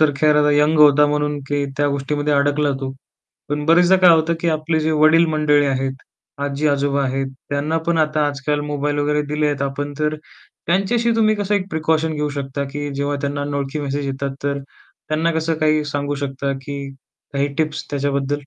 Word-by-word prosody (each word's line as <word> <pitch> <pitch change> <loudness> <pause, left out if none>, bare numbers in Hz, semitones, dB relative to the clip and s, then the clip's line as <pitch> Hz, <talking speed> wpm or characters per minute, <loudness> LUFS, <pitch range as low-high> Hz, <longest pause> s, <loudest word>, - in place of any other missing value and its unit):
तर 155 -1 +5
खैर 150 +1 +3 0.2
यंग 150 +2 +3
होता 150 0 +6
म्हणून 150 0 -1
की 145 0 0
त्या 145 +1 +2
गोष्टीमध्ये 145 +1 -1
अडकला 145 +1 +2
तु. 135 -1 -3 0.6
पण 150 0 -2
बऱ्याचदा 175 +3 +5
काय 180 - +9
होतं 165 0 +3
की 170 - 0
आपले 160 0 0
जे 155 +1 0
वडील 160 +2 +6
मंडळी 150 -1 +3
आहेत, 135 -1 -1 0.5
आजी-आजोबा 140 -1 0
आहेत 135 +1 -1 0.2
त्यांना 150 +3 -1
पण 170 -1 +1
आता 155 -1 +2
आजकाल 145 +1 -2
मोबाईल 145 0 -1
वगैरे 150 +1 +1
दिलेत 150 -2 0
आपण 145 +1 -3
तर 150 0 0 0.5
त्यांच्याशी 210 +7 +1
तुम्ही 215 -1 +3
कसं 205 0 -1
एक 195 -1 -1
प्रिकॉशन 160 0 0
घेऊ 150 0 -1
शकता 140 0 -3
की 145 0 -4
जेव्हा 140 +1 -1
त्यांना 145 +1 -2
अनोळखी 140 +1 -3
मेसेज 140 0 -3
येतात, 135 0 -3
तर 140 0 -1 0.5
त्यांना 160 +2 +1
कसं 160 0 0
काही 155 -1 +2
सांगू 145 0 -2
शकता 140 0 -3
की 140 0 -6 0.4
काही 140 0 0
टिप्स 155 0 -1
त्याच्याबद्दल? 140 -1 -1
145 Hz, 175 wpm, -20 LUFS, 140-155 Hz, 0.6 s, काय